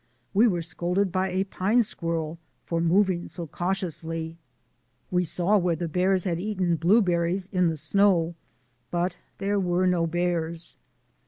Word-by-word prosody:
We 220 +5 +5
were 175 -6 0
scolded 180 +3 -1
by 185 +1 0
a 185 +1 0
pine 200 +5 +2
squirrel 165 -6 -3 0.3
for 165 -1 -1
moving 180 +1 +2
so 175 - -6
cautiously. 165 -2 -3 0.7
We 180 0 +2
saw 180 +5 +2
where 175 -2 +1
the 170 +2 -3
bears 185 +2 +1
had 170 -3 -1
eaten 185 -3 0
blueberries 180 0 +2
in 180 -2 +3
the 160 -1 -1
snow; 175 +1 +3 0.6
but 175 +1 -1 0.2
there 200 +1 0
were 180 0 +1
no 175 -2 +2
bears. 170 -1 -2
175 Hz, 145 wpm, -26 LUFS, 170-190 Hz, 0.7 s, We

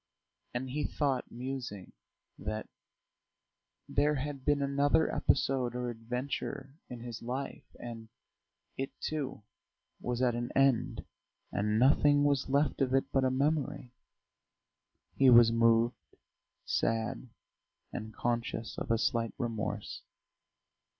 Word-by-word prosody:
And 125 +1 -3
he 150 +2 -1
thought, 140 -3 -1
musing, 120 -6 -6 0.5
that 110 +1 -4 1.2
there 150 +1 +2
had 140 0 -4
been 145 0 +2
another 140 +3 +2
episode 130 -3 +1
or 125 -1 -2
adventure 125 +3 -4 0.2
in 125 -2 -7
his 120 -1 -7
life, 135 +3 -4
and 115 -2 -8 0.7
it, 135 +1 -4
too, 140 -8 -3 0.6
was 120 -1 -2
at 125 -2 +3
an 120 +1 -3
end, 135 -4 +2 0.5
and 105 +2 0
nothing 145 +3 +5
was 140 -2 +2
left 140 +1 +2
of 130 -1 +2
it 135 - +1
but 135 - +2
a 130 - +3
memory.... 135 -2 0 1.2
He 135 -1 +5
was 120 -2 +8
moved, 115 +1 +2 0.5
sad, 115 +2 -1 0.6
and 110 0 -5
conscious 115 0 -2
of - - -5
a 115 - +3
slight 115 -1 0
remorse. 115 -3 -3
125 Hz, 115 wpm, -31 LUFS, 115-140 Hz, 1.2 s, was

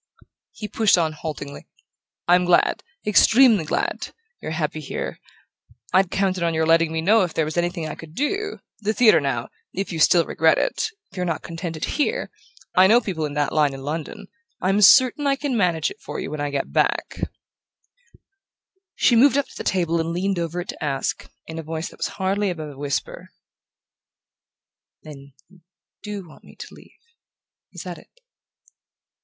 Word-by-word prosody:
He 215 - -7
pushed 215 -3 +3
on 160 -2 +1
haltingly: 150 -2 -7 0.6
"I'm 180 +1 +5
glad 175 -1 +3 0.2
extremely 215 -2 +5
glad - - -2 0.3
you're - - -5
happy 155 -1 -2
here...I'd 180 +5 -4
counted 190 -1 0
on 170 -1 0
your 160 0 +1
letting 165 0 +3
me 160 0 -1
know 215 +6 +4
if 180 -3 -2
there 160 - +1
was 155 - -5
anything 175 -1 -1
I - - -5
could 160 0 -12
do...The 295 - -3
theatre, 220 -9 +6
now 130 -3 -2 0.2
if 195 +1 -3
you 160 - -3
still 165 +1 +5
regret 160 0 +3
it - - 0 0.2
if 190 - -15
you're 180 - -1
not 165 -2 -2
contented 165 -1 -5
here...I 375 - 0
know 230 +4 +6
people 180 -9 -3
in 145 - -8
that 145 0 0
line 150 -3 +2
in 135 - -9
London 160 +8 -5 0.3
I'm 195 +3 +1
certain 260 +6 +6
I 275 - +3
can 275 -2 -2
manage 175 -7 +1
it - - -13
for - - -6
you - - -5
when 150 -1 -4
I 145 - -1
get 140 -1 -3
back - - 0 0.9
" 390 0 -36
She 240 - +3
moved 270 +4 +5
up 280 - +1
to - - -15
the - - -6
table 170 -3 0
and 165 0 -1
leaned 185 +2 -1
over 170 +1 -3
it 180 - -10
to - - -6
ask, 140 -2 -2 0.2
in 165 0 -7
a - - -3
voice 160 +1 -5
that - - -17
was - - 0
hardly 195 +2 0
above 155 -4 -5
a 135 - -14
whisper: 140 -1 -4 1.7
"Then 140 -2 -12
you 185 0 -22 0.4
DO 205 -3 -6
want 155 - -17
me - - -16
to - - -10
leave? - - -17 0.8
Is - - -8
that - - -7
it?" - - -20
175 Hz, 180 wpm, -23 LUFS, 155-210 Hz, 1.7 s, theatre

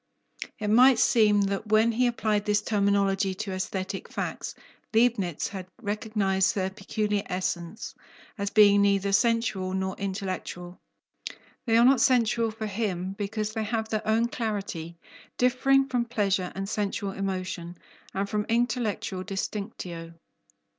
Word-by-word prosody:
It 210 -1 -3
might 250 +3 +6
seem 210 -3 +4
that 200 +2 -1
when 215 +2 +4
he 245 +2 +2
applied 215 -3 0
this 210 0 +1
terminology 200 -2 +1
to 205 0 -4
aesthetic 190 +1 -4
facts, - - -4 0.4
Leibnitz 220 -8 +2
had 190 -2 -7
recognized 205 -3 0
their 190 -1 -1
peculiar 210 +1 -2
essence, 180 +2 -3 0.4
as 200 -1 -2
being 205 -1 +6
neither 200 0 +2
sensual 200 -3 +1
nor 190 0 -2
intellectual. 185 -2 -5 0.9
They 225 0 +4
are 235 - +6
not 265 +1 +5
sensual 235 -3 +3
for 220 0 -6
him, 190 -3 -2
because 215 +1 -2
they 220 - -2
have 220 0 -2
their 215 0 -2
own 225 +2 +3
"clarity," 195 -8 -4 0.4
differing 270 +2 +3
from 245 -3 0
pleasure 200 -6 0
and 195 +1 -3
sensual 200 -1 -2
emotion, 185 -3 -4 0.3
and 195 +1 -2
from 210 0 -2
intellectual 230 -5 -1
"distinctio." 185 -4 -5
205 Hz, 135 wpm, -27 LUFS, 190-225 Hz, 0.9 s, might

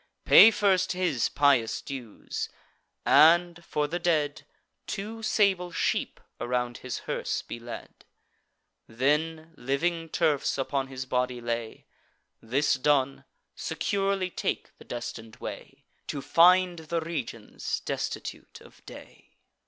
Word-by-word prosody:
Pay - - +10
first 195 -4 +2
his 175 -10 0
pious 140 -6 +3
dues; 125 -6 -6 0.6
and, 170 +2 +5
for 150 -2 -1
the 175 +4 -3
dead, 155 -4 0 0.4
Two 215 +3 -5
sable 195 -5 +2
sheep - - -1 0.2
around 120 0 -2
his 130 -2 -5
hearse - - -2
be 120 - -7
led; 120 0 -10 0.8
Then, 155 +6 -1
living 165 +6 -1
turfs 145 -3 +1
upon 135 0 -1
his 130 -1 -6
body 125 -1 -1
lay: 115 -1 -4 0.6
This 135 +6 +1
done, 135 0 +1 0.3
securely 195 -2 -1
take - - -3
the - - -14
destin'd 115 -2 -7
way, - - -9 0.2
To 145 - -3
find 180 0 +5
the 165 +1 -3
regions 135 -9 -4
destitute - - -5
of - - -18
day." - - -14
150 Hz, 115 wpm, -27 LUFS, 125-175 Hz, 0.8 s, Pay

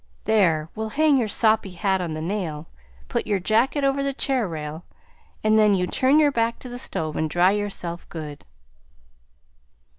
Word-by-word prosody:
There, 170 -8 +2
we'll 220 0 -4
hang 300 +2 +3
your 230 - 0
soppy 215 -1 +2
hat 190 +1 0
on 165 -3 -3
the 155 - -5
nail, 165 -5 -4 0.4
put - - -2
your 205 -2 +1
jacket 230 +9 +1
over 275 0 +1
the 275 -1 -2
chair 260 -6 0
rail, 155 0 -6 0.6
an' 215 0 +4
then 210 -2 +5
you 180 -1 0
turn 260 +9 +2
your 295 -2 +4
back 230 -2 0
to 250 - -8
the 245 0 -6
stove 155 - -2
an' 155 - 0
dry 175 +4 +3
yourself 195 -4 -4
good." 150 -3 -8
205 Hz, 175 wpm, -23 LUFS, 170-240 Hz, 0.6 s, then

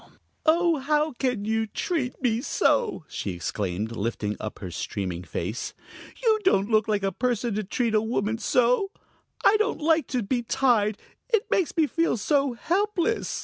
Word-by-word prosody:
"Oh, 335 0 +4
how 300 +2 +1
can 250 -5 -1
you 220 0 0
treat 270 - -2
me 230 -2 +2
so!" 425 - +1
she 100 - -4
exclaimed, 95 +4 -3
lifting 105 -1 -2
up 110 - -5
her 90 -3 -7
streaming 90 +1 -4
face. 105 +6 -4 0.5
"You 440 -2 +4
don't 210 - +2
look 215 -1 +3
like 210 -2 0
a 195 - +1
person 240 -1 -1
to 215 +1 -1
treat 225 +3 -1
a 215 - +4
woman 220 0 -1
so. 250 +12 +2 0.6
I 430 - +6
don't 430 -4 0
like 320 0 +2
to 250 -3 -1
be 240 +4 0
tied; 230 -4 +2 0.3
it 450 -4 +3
makes 360 -2 +1
me 320 - +5
feel 330 -3 0
so 275 +3 +1
helpless." 395 - 0
240 Hz, 165 wpm, -26 LUFS, 200-315 Hz, 0.6 s, I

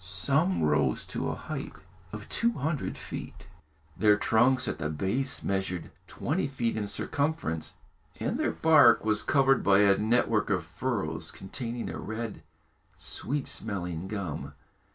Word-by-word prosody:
Some 140 - +1
rose 75 0 +2
to - - -1
a - - -2
height - - -6 0.4
of 105 -1 -7
two 235 0 +2
hundred 155 - -2
feet. - - -7 0.5
Their 105 +1 +4
trunks 125 +5 +3
at 75 - -3
the 80 -2 -2
base 100 - -1
measured 95 -2 -2 0.2
twenty 160 +2 -1
feet 120 -4 -1
in 105 -2 -2
circumference, 140 - -1 0.4
and - - -1
their - - +1
bark 145 -9 +5
was 105 -1 +3
covered 135 -2 +3
by 100 0 +5
a 100 -1 +5
network 110 -1 +2
of 90 -4 0
furrows 85 -3 -3
containing 115 +4 -5
a - - -5
red, 110 0 -5 0.5
sweet 145 0 -3
smelling 90 -5 -3
gum. 80 -8 -5
110 Hz, 140 wpm, -29 LUFS, 95-135 Hz, 0.5 s, bark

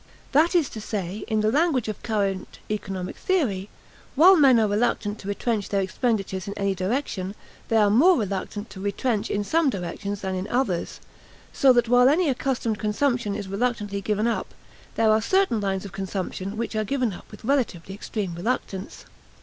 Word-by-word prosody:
That 320 +6 +4
is 330 -6 +4
to 220 - -7
say, 205 -1 -4
in 220 -2 +1
the 215 +1 +2
language 290 -4 +2
of 215 - -5
current 200 -4 -2
economic 195 -3 -4
theory, 215 - 0 0.5
while 355 +7 +8
men 270 -7 +6
are 220 - +3
reluctant 205 0 0
to 195 - -9
retrench 205 0 -1
their 200 -1 +1
expenditures 195 -2 -1
in 200 - -5
any 200 -1 +1
direction, 190 -1 -2 0.3
they 225 - 0
are 205 -2 +4
more 335 - +6
reluctant 205 +1 -4
to 190 - -9
retrench 205 +3 -1
in 205 - 0
some 320 +7 +2
directions 200 0 -4
than 190 -1 -2
in 185 +1 -3
others; 210 -7 -1 0.5
so 270 - +5
that 240 -1 +3
while 245 +2 +6
any 320 +2 +3
accustomed 250 -4 -1
consumption 215 0 0
is 200 - -5
reluctantly 205 -1 -2
given 210 +2 0
up, 235 - -2 0.4
there 225 -1 +3
are 215 0 +3
certain 370 - +2
lines 195 -1 -2
of 200 - -8
consumption 195 +1 -4
which 230 0 -3
are 215 - +1
given 250 -1 -1
up - - -12
with - - -12
relatively 225 -10 0
extreme 200 -2 -4
reluctance. 190 0 -4
215 Hz, 180 wpm, -25 LUFS, 195-245 Hz, 0.5 s, while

